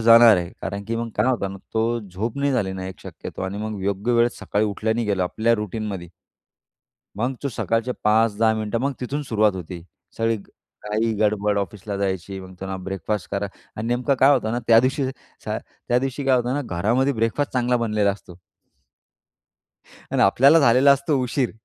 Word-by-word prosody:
जाणार 115 -1 +8
आहे. 85 -1 -3
कारण 100 0 -4
की 115 +2 -2
मग 115 0 -3
काय 105 +4 +2
होतं 115 -7 0
ना, 100 - -9 0.2
तो 115 +1 +1
झोप 105 +4 -5
नाही 140 0 +1
झाली 100 -7 0
ना, 95 0 -5
एक 95 -1 -9
शक्यतो - - -8
आणि 95 +2 -3
मग 105 -2 -4
योग्य 100 +4 0
वेळ 120 0 +4
सकाळी 105 +1 0
उठल्या 105 +2 -1
नाही 115 -2 -1
गेलो 100 -3 +1
आपल्या 110 +6 +1
रूटीनमध्ये. 105 -4 -4 1.1
मग 125 +4 0
तू 140 - -1
सकाळचे 115 0 -1
5-10 110 +1 +3
मिनिटं, 110 +1 -2
मग 140 +2 0
तिथून 140 +4 -3
सुरुवात 110 -5 +2
होती. 90 -1 -7 0.3
सगळी 115 0 +1
घाई-गडबड 105 0 -2
ऑफिसला 100 0 -4
जायची, 95 -1 -2
मग 95 0 -11
त्यांना 95 0 -4
ब्रेकफास्ट 95 +2 -3
करा 100 0 -1 0.3
आणि 110 +2 -4
नेमकं 125 +3 +1
काय 135 - +7
होतं 115 -5 +1
ना 120 - 0
त्या 115 -1 +7
दिवशी 130 +2 0 0.4
स - - -8
त्या 120 - -2
दिवशी 135 +2 -3
काय 130 -1 +4
होतं 125 +2 0
ना, 145 - -1
घरामध्ये 120 +7 +1
ब्रेकफास्ट 115 +4 -1
चांगला 125 -1 +2
बनलेला 105 -3 +1
असतो. 95 -3 -9 1.8
आणि - - +3
आपल्याला 135 +11 +6
झालेला 130 +2 +6
असतो 140 0 0
उशीर. 125 0 0
110 Hz, 180 wpm, -23 LUFS, 100-120 Hz, 1.8 s, जाणार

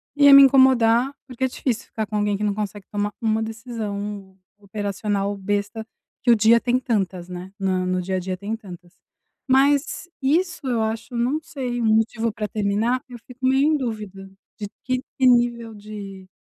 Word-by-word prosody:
ia 285 -1 +7
me 275 - +11
incomodar, 260 -1 +4
porque 255 0 -6
é - - +4
difícil 250 -2 -3
ficar 220 - -4
com 215 - -5
alguém 205 -1 +1
que 210 - -4
não 205 -1 +1
consegue 205 -1 -5
tomar 205 0 -2
uma 220 -1 +1
decisão 210 -4 -6 0.2
operacional 205 0 -3
besta, 205 +2 -3 0.4
que 245 - +5
o - - +7
dia 225 +2 +5
tem 250 +1 +1
tantas, 195 -8 -2
né, 180 +1 -8
na 185 -1 0
no 185 0 0
dia 190 +1 -3
a - - 0
dia 185 0 -4
tem 205 +4 -4
tantas. 180 -5 -12 0.6
Mas 280 +5 +2
isso 335 +4 0
eu 240 -3 0
acho, 225 +3 -3
não 245 +6 0
sei, 265 -7 -4
um - - 0
motivo 225 +1 0
pra 210 -1 -3
terminar, 215 +5 0
eu 245 - -9
fico 250 +2 -8
meio 265 +2 +3
em - - +2
dúvida 210 -7 -6 0.3
de 205 - -4 0.2
que 255 0 -1 0.2
que 260 - +5
nível 240 -2 +2
de 200 -2 -9
220 Hz, 185 wpm, -22 LUFS, 200-250 Hz, 0.6 s, me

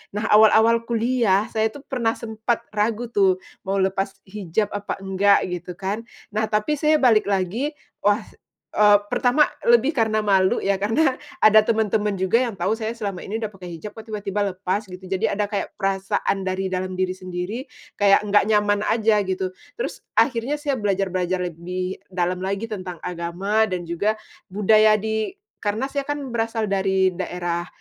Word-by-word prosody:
Nah, 210 +2 -1
awal-awal 220 +2 +5
kuliah 230 -3 +1
saya 220 0 +1
tuh 270 +6 -11
pernah 235 -5 -1
sempat 220 +1 -2
ragu 220 +3 -1
tuh, 190 -3 +2 0.2
mau 195 - 0
lepas 195 0 +1 0.2
hijab 200 +1 -2
apa 205 0 -4
enggak 195 +1 +3
gitu 180 0 -5
kan. 195 +4 -3 0.3
Nah, 215 +1 0
tapi 215 +8 0
saya 310 0 +4
balik 240 -9 +4
lagi, 205 - -1 0.2
wah, 205 +2 +2 0.5
eee, 210 -1 +6
pertama 265 +4 +3 0.2
lebih 240 +4 +5
karena 220 -1 +2
malu 190 -2 +3
ya, 195 0 +1
karena 255 +7 +2 0.2
ada 215 0 +8
temen-temen 215 -2 +1
juga 190 +4 +3
yang 245 -3 -1
tahu 195 +4 -1
saya 220 0 -3
selama 200 -6 -5
ini 220 +3 -4
udah 220 - -2
pakai 195 -3 -13
hijab 205 +7 -9
kok 220 - -9
tiba-tiba 205 -1 -2
lepas 195 +3 -2
gitu. 180 0 -10
Jadi 190 -1 0
ada 205 0 -1
kayak 205 -2 -3
perasaan 195 0 -1
dari 190 0 -1
dalam 185 0 -2
diri 185 0 -1
sendiri 185 +7 -5 0.3
kayak 200 -1 +5
enggak 205 -1 +3
nyaman 210 -1 +2
aja 220 -1 +3
gitu. 190 0 -2 0.3
Terus 480 - -5
akhirnya 250 0 +2
saya 285 -3 -1
belajar 195 -2 0
belajar 185 0 -1
lebih 180 +2 -4 0.2
dalam 180 0 0
lagi 200 +4 -3
tentang 185 -5 -6
agama 180 +5 0
dan 180 -3 -3
juga 200 +6 +1 0.4
budaya 215 +1 +5
di 220 - -2 0.3
karena 220 +6 -2
saya 280 -1 -3
kan 290 - -1 0.2
berasal 225 -2 -1
dari 190 -1 +2
daerah, 175 -1 -3
205 Hz, 165 wpm, -23 LUFS, 190-225 Hz, 0.5 s, ada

